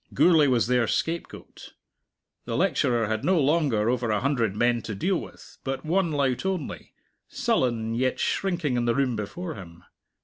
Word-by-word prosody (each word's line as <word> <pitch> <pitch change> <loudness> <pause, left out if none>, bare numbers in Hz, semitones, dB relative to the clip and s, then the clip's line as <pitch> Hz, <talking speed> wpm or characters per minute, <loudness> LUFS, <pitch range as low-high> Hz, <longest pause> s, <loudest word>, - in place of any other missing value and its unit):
Gourlay 160 -5 +5
was 125 -3 +2
their 125 -1 +2
scapegoat. 165 +10 -4 0.7
The - - -2
lecturer 120 -3 +1
had 110 0 -2
no 185 -1 +3
longer 140 -7 +2
over 120 -1 0
a 105 -1 +1
hundred 120 -6 0
men 120 +1 +2
to 110 -1 -6
deal 185 - 0
with, - - -13
but 135 +1 -4
one 175 +1 +1
lout 140 -4 0
only, 190 -6 -4 0.3
sullen 115 -3 0
yet 130 +2 0
shrinking 175 -9 0
in 120 - 0
the 120 -1 +1
room 135 -3 +1
before 160 - -5
him. 85 - -12
125 Hz, 165 wpm, -26 LUFS, 115-155 Hz, 0.7 s, Gourlay